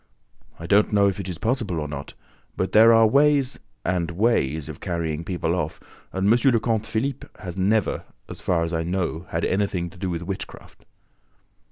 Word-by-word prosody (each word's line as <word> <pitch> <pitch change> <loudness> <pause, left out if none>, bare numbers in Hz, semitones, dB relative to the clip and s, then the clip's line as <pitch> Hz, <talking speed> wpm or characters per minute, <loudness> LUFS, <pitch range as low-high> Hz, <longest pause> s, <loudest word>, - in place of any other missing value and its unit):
"I 85 - -8
don't 100 +4 +3
know 100 -1 +4
if 100 0 -1
it 95 -1 -5
is 90 - -4
possible 110 -5 -1
or 75 - -3
not; 70 -1 -7 0.4
but 95 - -1
there 110 +2 +7
are 115 0 +6
ways 140 +2 +3 0.3
and 90 -2 0
ways 85 - +1
of - - -8
carrying 80 -2 -3
people 85 -2 -1
off; 80 -4 -2 0.3
and 95 +1 -1
M. 120 +3 +4
le 115 - +3
Comte 110 -1 -1
Philippe 120 +5 -2
has 90 -3 -7
never, 100 +2 +1 0.2
as - - -9
far 85 -2 +1
as 85 +1 -3
I 80 - 0
know, 85 0 -2
had 85 0 -1
anything 95 -3 -1
to 90 - -16
do 95 0 -2
with 85 -1 -3
witchcraft." 95 +2 -8
95 Hz, 190 wpm, -24 LUFS, 85-110 Hz, 0.4 s, there